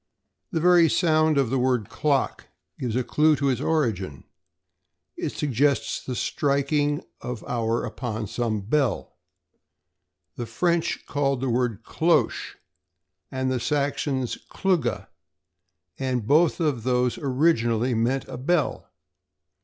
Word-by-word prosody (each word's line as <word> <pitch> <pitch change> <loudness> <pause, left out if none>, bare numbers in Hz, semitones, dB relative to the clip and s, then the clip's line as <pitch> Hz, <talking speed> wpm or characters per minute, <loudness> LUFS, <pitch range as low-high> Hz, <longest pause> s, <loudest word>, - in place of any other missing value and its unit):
The 170 - -1
very 175 -1 +5
sound 155 -3 +3
of 135 -4 +2
the 135 - +1
word 125 -5 +1
"clock" 140 -3 -1 0.3
gives 120 -3 -2
a 130 - +1
clue 155 +4 +3
to 140 -1 0
its 130 - 0
origin. 105 - -1 0.9
It - - -3
suggests 140 0 0
the 130 - -4
striking 145 +2 0 0.2
of 125 -3 -5
the - - -8
hour 115 -1 0
upon 110 -3 -4
some 110 0 -2
bell. 130 +3 -1 1.2
The 120 - -4
French 170 +8 0
called 140 -2 0
the 130 -1 -1
word 120 -3 -1
cloche - - +1 0.7
and 130 0 -1
the 130 - 0
Saxons 140 -1 -1
clugga, 135 - 0 0.9
and 130 -4 -1
both 155 +8 +3
of 145 -9 0
these 125 0 +1
originally 125 -4 +1
meant 120 +4 0
a - - -7
bell. 155 +5 0
130 Hz, 125 wpm, -25 LUFS, 120-150 Hz, 1.2 s, very